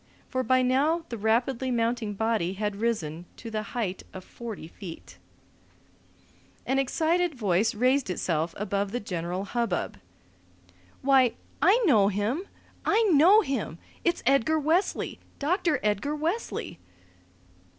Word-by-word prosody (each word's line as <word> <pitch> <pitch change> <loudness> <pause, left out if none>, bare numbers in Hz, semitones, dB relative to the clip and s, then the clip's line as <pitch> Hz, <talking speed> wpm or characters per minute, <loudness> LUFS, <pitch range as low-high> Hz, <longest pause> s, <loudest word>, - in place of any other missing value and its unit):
For 255 - 0
by 255 +1 +3
now 295 +6 +2
the 235 - -4
rapidly 240 +4 +1
mounting 230 -3 0
body 220 -4 0
had 205 0 -3
risen 175 -7 -2
to 230 - -8
the 215 -1 -1 0.2
height 195 -6 -2
of 185 - -7
forty 220 -9 -8
feet. 170 -1 -10 1.5
An 270 +1 +1
excited 325 +4 +1
voice 210 -1 +1
raised 255 +2 +2
itself 165 -2 -1
above 200 0 -2
the 245 - 0
general 180 -1 -3
hubbub. 230 -4 -2 1.0
"Why, 260 -3 +5 0.3
I 405 - +6
know 215 - +5
him! 215 - -1 0.4
I 440 +3 +3
know 360 +9 +7
him! 265 - -3 0.3
It's 345 - 0
Edgar 275 +4 +3
Wesley! 320 +6 0 0.2
Doctor 330 +1 +1
Edgar 210 +8 0
Wesley!" 320 - -3
235 Hz, 125 wpm, -27 LUFS, 200-280 Hz, 1.5 s, know